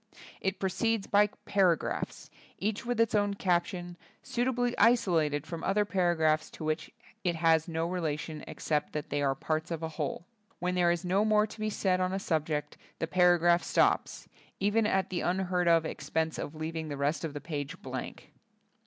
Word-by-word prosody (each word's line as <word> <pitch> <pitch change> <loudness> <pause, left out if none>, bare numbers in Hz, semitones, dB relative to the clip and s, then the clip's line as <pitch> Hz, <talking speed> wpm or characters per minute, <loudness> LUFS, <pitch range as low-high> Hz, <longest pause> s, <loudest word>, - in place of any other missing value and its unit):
It 190 0 -1
proceeds 200 +3 0
by 205 0 +4 0.2
para 185 -4 +4
graphs, - - -5 0.3
each 215 +4 -2
with 245 -2 -1
its 230 -1 +3
own 205 -1 +2
caption, 175 -1 -1 0.3
suitably 245 0 0
isolated 170 - +3
from 165 0 -6
other 205 +1 +2
para 180 -4 +1
graphs 155 -1 +2
to - - -7
which 155 0 -2 0.3
it 175 -3 +1
has 160 0 +3
no 165 -1 -1
relation 155 -3 -3
ex 155 - -9
cept 150 -2 0
that 150 -1 -4
they 145 0 0
are 135 -1 +1
parts 155 +3 -2
of 165 -1 -4
a 160 - -2
whole. 155 +1 -4 0.3
When 180 0 -1
there 175 -1 +3
is 175 +1 0
no 190 +3 +2
more 215 -1 +4
to 220 +1 -11
be 215 0 -1
said 185 -3 +1
on 185 0 0
a - - 0
subject, 155 -5 -2 0.2
the - - -1
paragraph 175 0 +4
stops, - - +1 0.3
even 210 +2 +2
at 190 -2 0
the 180 - -1
unheard 180 -1 0
of 165 -1 +5
expense 160 0 -2
of 145 - -5
leaving 160 0 -4
the 145 - -4
rest 145 +4 0
of 155 -3 -4
the - - -3
page 150 +2 -5
blank. 130 -1 -6
175 Hz, 190 wpm, -30 LUFS, 155-195 Hz, 0.3 s, of